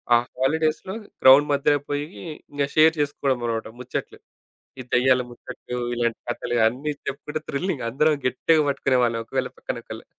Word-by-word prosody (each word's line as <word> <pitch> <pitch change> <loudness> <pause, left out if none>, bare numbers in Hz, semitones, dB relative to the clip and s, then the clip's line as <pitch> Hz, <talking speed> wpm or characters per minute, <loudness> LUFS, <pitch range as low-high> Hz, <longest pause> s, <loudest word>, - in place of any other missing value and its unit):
ఆ - - +7 0.2
హాలిడేస్‍లో 160 +7 0 0.3
గ్రౌండ్ 140 +3 +8
మధ్యలో 145 +1 +2
పోయి 145 0 -1 0.5
ఇంగ 145 0 -1
షేర్ 160 +1 +6
చేసుకోవడం 140 -3 0
అనమాట 115 -1 -2
ముచ్చట్లు. 125 - -5 0.6
ఈ - - -4
దెయ్యాల 125 0 +4
ముచ్చట్లు, 125 0 -8 0.2
ఇలాంటి 120 -1 -1
కథలు 120 0 -2
అన్నీ 140 +6 -3
చెప్పుకుంటే 150 +2 -4
థ్రిల్లింగ్. 140 -3 -2
అందరం 150 +4 +2
గట్టిగా 155 +4 +3
పట్టుకునే 135 -2 +1
వాళ్ళం 115 -1 0
ఒకళ్ళు - - -2
పక్కన - - -4
ఒకళ్ళు. - - -9
140 Hz, 145 wpm, -24 LUFS, 125-150 Hz, 0.6 s, గ్రౌండ్